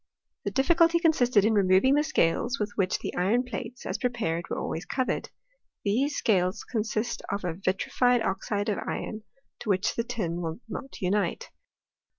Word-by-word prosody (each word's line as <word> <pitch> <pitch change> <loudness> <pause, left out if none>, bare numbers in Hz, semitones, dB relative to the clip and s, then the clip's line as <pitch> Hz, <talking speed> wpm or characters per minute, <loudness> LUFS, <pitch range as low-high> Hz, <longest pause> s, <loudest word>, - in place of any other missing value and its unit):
The - - +1
difficulty 335 - +4
consisted 250 - +3
in 220 - +3
removing 195 +5 +4
the 295 +1 +4
scales 245 - +1
with 210 -1 -1
which 185 -2 +1
the - - -5
iron 210 +8 +2
plates, 250 0 -7
as - - -3
prepared, 210 -9 -1
were - - -2
alwavs 165 - -3
covered. 260 -2 -1 0.6
These 265 +9 +1
scales 185 -4 +1
consist 225 +1 -2
of 200 0 -2
a 175 - -1
vitrified 225 +6 +1
oxide 200 +2 -1
of 205 - 0
iron, 215 -1 -4 0.4
to - - -6
which 195 +1 +2
the 230 - 0
tin 190 -8 -3
will 165 +3 -4
not 270 - -7
unite. 195 +2 0
215 Hz, 165 wpm, -27 LUFS, 190-250 Hz, 0.6 s, difficulty